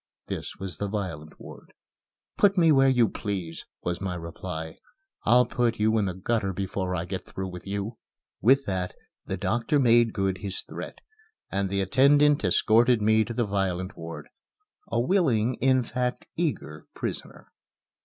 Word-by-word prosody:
(This - - -5
was 95 -5 -7
the 100 - -1
violent 90 -7 -5
ward.) - - -12 0.6
"Put 200 -1 +3
me 165 -2 +5
where 135 -2 +5
you 125 -3 +4
please," 95 -8 -5 0.2
was 90 +1 -2
my 95 -2 -2
reply. 85 -1 -6 0.5
"I'll 125 +1 +6
put 120 -1 0
you 110 +1 +3
in 105 - +1
the 90 -2 -3
gutter 100 0 -1
before 95 0 -2
I 85 0 -2
get 95 +1 -5
through 95 0 -6
with 90 +1 -9
you." 100 +3 -4 0.4
With 135 +4 +4
that 90 -2 -2 0.3
the - - -2
doctor 120 +6 0
made 120 -3 +4
good 95 -2 -1
his 95 +1 -4
threat, - - -8 0.5
and 100 0 0
the 100 0 0
attendant 145 +8 +4
escorted 115 +5 +4
me 110 +1 +4
to 120 - -5
the 120 - +1
violent 95 -2 -2
ward 85 0 -8 0.6
a - - 0
willing, 130 - +2
in 130 0 +4
fact, 125 +1 -2
eager 75 - -3
prisoner. - - -6
100 Hz, 160 wpm, -26 LUFS, 95-125 Hz, 0.6 s, I'll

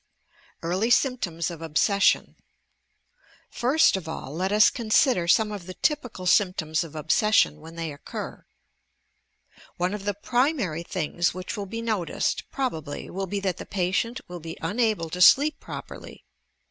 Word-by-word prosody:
EARLY 185 +7 0
SYMPTOMS 215 - +1
OF 165 -2 -9
OBSESSION 190 +5 +2 1.2
First 280 +4 +3
of 185 -4 -5
all 140 -3 -6
let 185 +4 -1
us 210 0 +6
consider 220 - +2
some 210 +4 +4
of 195 -4 -7
the 185 - -7
typical 250 -11 -1
symptoms 180 -5 +2
of 160 -2 -11
obsession 155 +1 +2
when 165 +1 -11
they 165 -3 -4
occur:— 140 - -8 1.3
One 180 +2 0
of 205 -1 -6
the 205 -1 -1
primary 240 - 0
things 170 0 -1
which 185 +4 -5
will 200 -2 -5
be 230 +3 -5
noticed, 215 -7 -1
probably, 160 - -4
will 195 +1 -3
be 200 +2 -2
that 190 -2 -1
the - - -7
patient 200 +6 -1
will 175 0 -7
be 165 0 -8
unable 205 -2 0
to 180 - -3
sleep 290 +10 +6
properly. - - -9
190 Hz, 145 wpm, -25 LUFS, 170-225 Hz, 1.3 s, us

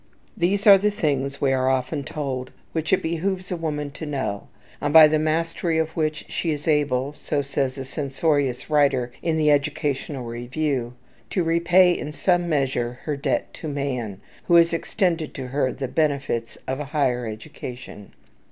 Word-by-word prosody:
These 195 +4 +1
are 200 -2 +9
the 210 +2 +2
things, 140 -8 -1
we 135 -2 +2
are 130 0 +2
often 130 +3 -1
told, 135 -3 -4 0.2
which 160 -1 -2
it 190 - +3
behooves 180 +3 -2
a - - 0
woman 150 -3 -3
to 155 - -7
know, 135 -8 -3 0.3
and 145 - 0
by 160 0 +10
the 155 0 +1
mastery 165 +1 0
of 160 -1 +1
which 155 -1 -1
she 170 - -2
is 150 0 -3
able, 145 -3 +1
so 145 -1 -2
says 135 -1 -2
a 135 - -5
censorious 140 -1 -1
writer 140 -5 +2
in 160 -2 0
the 150 -1 +4
"Educational 145 -2 -1
Review," 120 +1 -2 0.3
"to 185 - 0
repay 175 +2 +4
in 150 - -5
some 175 +2 +1
measure 130 -5 0
her 150 - -2
debt 140 - -1
to 160 - -7
man, 130 -8 -3 0.3
who 175 - +4
has 170 0 +6
extended 165 -2 -1
to 130 - -5
her 130 -1 0
the 135 +2 -4
benefits 140 -5 -1
of 130 +1 -2
a 150 - -3
higher 130 -5 0
education." 110 0 -8
145 Hz, 170 wpm, -24 LUFS, 130-160 Hz, 0.3 s, by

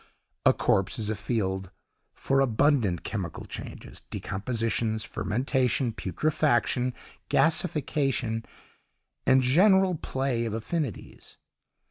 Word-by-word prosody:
A - - +8
corpse 95 -1 +1
is 110 -2 -1
a - - -1
field 95 -3 -2 0.4
for 135 0 0
abundant 120 - +2
chemical - - -5
changes, - - -8
decompositions, 110 +1 -2
fermentation, 125 +3 0
putrefaction, 125 - 0 0.3
gasification, 140 -8 +1 0.8
and 130 0 +5
general 190 +7 +5
play 130 -6 -2
of 110 - -3
affinities. 130 - -5
125 Hz, 90 wpm, -27 LUFS, 110-140 Hz, 0.8 s, A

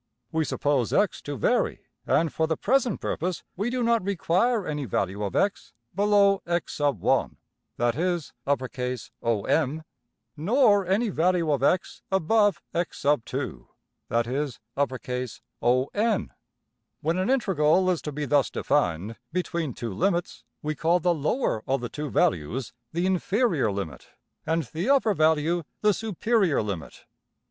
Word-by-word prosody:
We 160 -1 +1
suppose 140 -7 0
$x$ - - +2
to - - -5
vary, - - +1 0.2
and 165 -2 +2
for 160 - +1
the 160 -1 -1
present 250 -2 +1
purpose 180 0 -2
we 205 +6 -1
do 250 0 -1
not 230 -3 +2
require 200 +3 +1
any 150 -2 -3
value 100 -1 -1
of~$x$ 195 - -1 0.2
below~$x_1$ 190 - +2 0.4
(that 120 0 +1
is~$OM$), 135 - -1 0.5
nor 205 - +3
any 210 +5 +2
value 170 -2 +2
of~$x$ 145 +6 +1
above~$x_2$ 175 - 0 0.4
(that 115 +1 +1
is~$ON$). 130 - -1 0.7
When 165 +4 0
an 185 - 0
integral 185 - +3
is 175 - -1
to 150 - -5
be 145 +1 -3
thus 145 0 +3
defined 90 +7 0
between 170 -6 -2
two 115 -4 -4
limits, 175 - -1 0.2
we 155 +1 -1
call 165 +4 +2
the 175 +1 +2
lower 155 - 0
of 135 +1 +1
the 120 -1 -5
two 150 +3 -5
values 100 - 0 0.2
\emph{the 170 +2 -1
inferior 185 - +1
limit}, 95 -6 -5 0.4
and 165 +1 +1
the 165 - -3
upper 270 -6 +4
value 160 +1 +2 0.2
\emph{the 210 0 +5
superior 210 - +1
limit}. 100 -6 -6
160 Hz, 120 wpm, -26 LUFS, 130-190 Hz, 0.7 s, emph{the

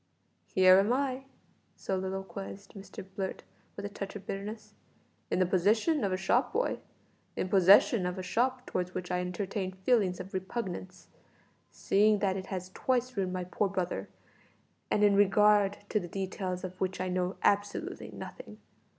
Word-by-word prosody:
"Here 185 0 +6
am 200 +4 +2
I," 265 0 0 0.5
soliloquised 195 +1 -5
Mr 195 -2 -9
Blurt 190 -2 -4 0.3
with 200 - -6
a - - -3
touch 200 -1 -6
of 200 - -8
bitterness, 210 +2 -6 0.6
"in - - 0
the 185 - +4
position 215 - +2
of 195 - +1
a 185 - 0
shop 240 +7 +1
boy, 485 +4 0 0.6
in 185 - -2
possession 195 +1 +6
of 180 +1 -4
a 185 - -4
shop 250 +6 0
towards 180 0 -3
which 180 -1 -4
I 180 - +1
entertain 185 +1 -3
feelings 190 -1 +1
of 185 +1 -8
repugnance, 185 -1 -5 0.6
seeing 210 +2 +3
that 195 -2 0
it 190 0 -5
has 185 -1 -5
twice 255 +3 -1
ruined 190 -2 -1
my 185 -1 -2
poor 195 +3 -1
brother, 185 -2 -3 0.8
and 210 - +2
in 205 -1 +5
regard 205 0 +4
to 210 - +2
the 175 - -6
details 185 0 -4
of 185 0 -7
which 185 0 -1
I 185 - -1
know 180 +1 -1
absolutely 205 0 0
nothing. - - -9
195 Hz, 160 wpm, -30 LUFS, 185-210 Hz, 0.8 s, Here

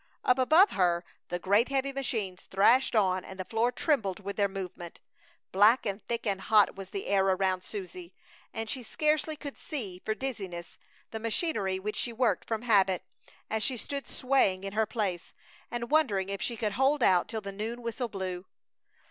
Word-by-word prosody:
Up 250 +1 +4
above 320 +10 +6
her 175 -2 +1 0.2
the 175 - -1
great 205 +7 +2
heavy 275 0 0
machines 220 -9 -3
thrashed 230 +7 +4
on 185 -3 +2
and 190 0 -10
the 185 - -3
floor 230 +4 +1
trembled 225 - 0
with 200 0 -6
their 200 -1 +2
movement. 185 -3 -7 0.5
Black 210 +7 +5
and 200 0 -3
thick 235 0 -2
and 195 -3 0
hot 210 0 +4
was 195 -1 -8
the 195 - -5
air 195 -1 +2
around 190 -1 +1
Susie 180 -3 -8 0.4
and 225 0 -4
she 260 +3 -3
scarcely 305 +5 0
could 285 -2 -8
see, 200 - -5
for 215 - -1
dizziness, 195 -10 -5 0.3
the 220 - -4
machinery 220 - 0
which 210 +3 -4
she 240 - -1
worked 235 +1 0
from 225 0 -2
habit, 195 -6 +3 0.4
as 220 0 -2
she 255 +3 0
stood 280 +5 -5
swaying 250 -8 +1
in 195 0 -5
her 220 0 +1
place, 195 -7 -3 0.4
and 240 +2 -4
wondering 210 -12 +2
if 200 0 -4
she 235 - -1
could 210 -1 -1
hold 270 +5 +2
out 180 -2 +4
till 220 - -3
the 200 -1 -6
noon 225 +4 -5
whistle 235 +1 -3
blew. 185 -2 -5
210 Hz, 185 wpm, -29 LUFS, 190-245 Hz, 0.5 s, above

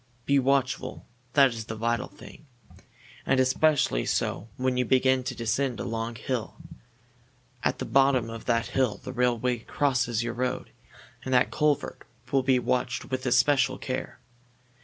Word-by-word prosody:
Be 140 0 +3
watchful 135 -1 0 0.3
that 140 -2 +6
is 110 -1 -6
the 110 - -6
vital 115 +1 -1
thing. 155 - -15 0.8
And 130 - +2
especially 130 - +2
so 105 - -1
when 130 0 0
you 125 - +2
begin 130 +1 +3
to 130 -1 -3
descend 120 +2 -1
a - - -3
long 115 +1 -3
hill. 120 0 -4 1.1
At - - +1
the - - -4
bottom 135 -3 +3
of 115 0 -8
that 115 -1 +1
hill 130 -5 0
the 130 - -6
railway 125 -1 +1
crosses 125 -2 0
your 120 0 -3
road, 125 +1 -3 0.5
and 130 - -5
that 125 - +3
culvert 150 -2 0 0.3
will 135 - +3
be 130 0 +3
watched 125 +1 -1
with 130 0 -2
especial 130 +1 +3
care. 130 0 -5
125 Hz, 155 wpm, -27 LUFS, 120-135 Hz, 1.1 s, that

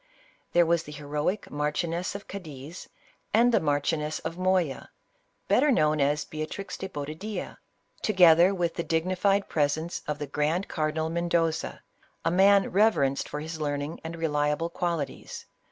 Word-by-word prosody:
There 175 0 +5
were 170 +1 +3
the 160 -2 -8
heroic 150 +7 -3
Marchioness 165 +5 -2
of 200 - -7
Cadiz, 160 -4 -9 0.5
and 240 +2 +5
the 225 - +4
Marchioness 150 0 0
of 165 +1 -4
Moya, 185 -6 0 0.6
better 295 - +4
known 155 -8 +3
as 145 +2 +1
Beatriz 155 +6 -5
de 190 - -5
Bobadilla, 155 +8 -6 0.4
together 180 -3 +6
with 175 -3 -1
the 170 - -3
dignified 185 +5 +1
presence 155 +3 -1
of 150 -1 -2
the 145 - -4
grand 150 +6 -1
cardinal 160 0 -1
Mendoza, 170 -1 -1 0.4
a - - +2
man 195 +2 +5
reverenced 175 -10 +2
for 150 - -4
his 160 0 -6
learning 145 +1 -2
and 165 +1 -5
reliable 150 0 0
qualities. 170 -6 -4
165 Hz, 140 wpm, -27 LUFS, 150-180 Hz, 0.6 s, together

